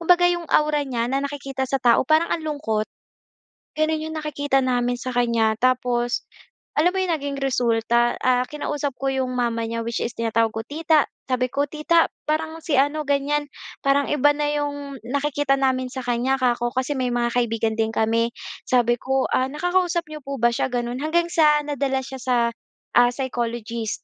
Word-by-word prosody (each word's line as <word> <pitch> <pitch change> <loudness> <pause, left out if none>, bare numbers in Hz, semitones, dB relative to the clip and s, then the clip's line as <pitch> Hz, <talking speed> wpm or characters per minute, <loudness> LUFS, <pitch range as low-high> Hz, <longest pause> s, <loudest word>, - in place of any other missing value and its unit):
kumbaga 355 +1 +4
‘yong 345 -1 -4
aura 300 -1 +3
niya 240 -4 -2
na 275 - +1
nakikita 275 -2 -4
sa 270 - +1
tao, 235 +1 +4
parang 315 +5 +3
ang 330 - -2
lungkot. 285 -9 -1 0.9
Gano’n 310 0 +1
‘yong 315 - -6
nakikita 285 -3 0
namin 245 -1 +1
sa 255 +1 -4
kanya. 230 -3 +2
Tapos, 245 -1 +1 0.5
alam 330 +4 +4
mo - - -2
‘yong 370 -2 0
naging 280 -1 -4
resulta, 240 -2 +2
ah, 250 0 +2
kinausap 295 -1 -3
ko 270 - -1
‘yong 265 -1 0
mama 235 -2 -1
niya, 230 0 -3
which 235 0 -2
is 235 - -3
tinatawag 225 -1 0
ko, 225 - -3
tita. 315 +1 +2 0.2
Sabi 255 0 +1
ko, 285 +3 0
"Tita, 325 +3 +3 0.2
parang 320 +1 -1
si 300 -4 0
ano, 290 +3 +2
ganyan, 290 +1 0 0.4
parang 275 0 +3
iba 290 0 +4
na 295 0 -1
‘yong 285 -3 -3
nakikita 285 +1 0
namin 260 -1 0
sa 260 0 -6
kanya," 245 +2 +1
‘ka 250 -2 +3
ko 240 - 0
kasi 260 +2 -1
may 255 -1 0
mga 240 -1 0
kaibigan 225 -2 +1
din 220 0 +2
kami. 225 +1 +1 0.4
Sabi 240 -1 +3
ko," 265 0 +1
Ah, 260 +1 +2
nakakausap 350 +3 0
n’yo 305 -1 -8
po 275 0 -4
ba 235 0 +3
siya?" 235 - 0
Gano’n. 245 +1 -3
Hanggang 340 +3 +1
sa 300 -3 +5
nadala 275 -2 -1
siya 265 0 -8
sa, 255 0 +1 0.6
ah, 245 0 +6
psychologist. 235 -3 -3
265 Hz, 180 wpm, -23 LUFS, 240-295 Hz, 0.9 s, ah